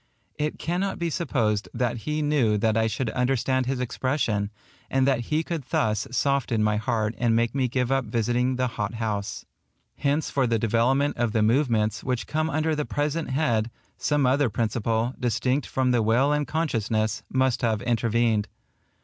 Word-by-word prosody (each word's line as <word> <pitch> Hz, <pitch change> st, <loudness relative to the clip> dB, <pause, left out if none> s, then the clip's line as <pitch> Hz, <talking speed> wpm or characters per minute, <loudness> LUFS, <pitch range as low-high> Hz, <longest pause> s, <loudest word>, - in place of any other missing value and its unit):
It 150 Hz, 0 st, -1 dB
cannot 180 Hz, +4 st, -2 dB
be 170 Hz, -2 st, -2 dB
supposed 115 Hz, -, 0 dB
that 120 Hz, 0 st, 0 dB
he 150 Hz, 0 st, 0 dB
knew 135 Hz, -8 st, +2 dB
that 110 Hz, +1 st, +1 dB
I 110 Hz, 0 st, +2 dB
should 110 Hz, +1 st, -2 dB
understand 130 Hz, 0 st, 0 dB
his 130 Hz, -1 st, -1 dB
expression, 125 Hz, -5 st, -1 dB, 0.4 s
and 135 Hz, -1 st, +2 dB
that 125 Hz, -4 st, +1 dB
he 155 Hz, +1 st, +1 dB
could 165 Hz, -3 st, -4 dB
thus 110 Hz, -1 st, 0 dB
soften 125 Hz, -3 st, +1 dB
my 105 Hz, 0 st, +2 dB
heart 110 Hz, -1 st, -1 dB
and 120 Hz, -2 st, +2 dB
make 115 Hz, 0 st, +1 dB
me 135 Hz, -2 st, +1 dB
give 125 Hz, +1 st, -1 dB
up 135 Hz, -2 st, +1 dB
visiting 120 Hz, +3 st, 0 dB
the 130 Hz, 0 st, 0 dB
hot 115 Hz, -2 st, -3 dB
house. 105 Hz, -2 st, -3 dB, 0.5 s
Hence 145 Hz, +2 st, 0 dB
for 135 Hz, -3 st, +1 dB
the 115 Hz, -1 st, +2 dB
development 120 Hz, +6 st, +1 dB
of 120 Hz, -2 st, 0 dB
the 110 Hz, -, +2 dB
movements 110 Hz, -3 st, +1 dB
which 125 Hz, -1 st, -2 dB
come 155 Hz, +1 st, -1 dB
under 155 Hz, +1 st, 0 dB
the 150 Hz, -, -1 dB
present 150 Hz, +3 st, -2 dB
head, 120 Hz, -5 st, +1 dB, 0.3 s
some 145 Hz, -2 st, +1 dB
other 130 Hz, +1 st, +3 dB
principle, 115 Hz, +2 st, -1 dB
distinct 125 Hz, +3 st, 0 dB
from 130 Hz, -1 st, +1 dB
the 120 Hz, -2 st, +3 dB
will 120 Hz, +7 st, +3 dB
and 150 Hz, -2 st, 0 dB
consciousness, 115 Hz, -8 st, -1 dB
must 130 Hz, -1 st, +1 dB
have 110 Hz, -3 st, 0 dB
intervened. 115 Hz, -2 st, +1 dB
125 Hz, 175 wpm, -25 LUFS, 110-140 Hz, 0.5 s, other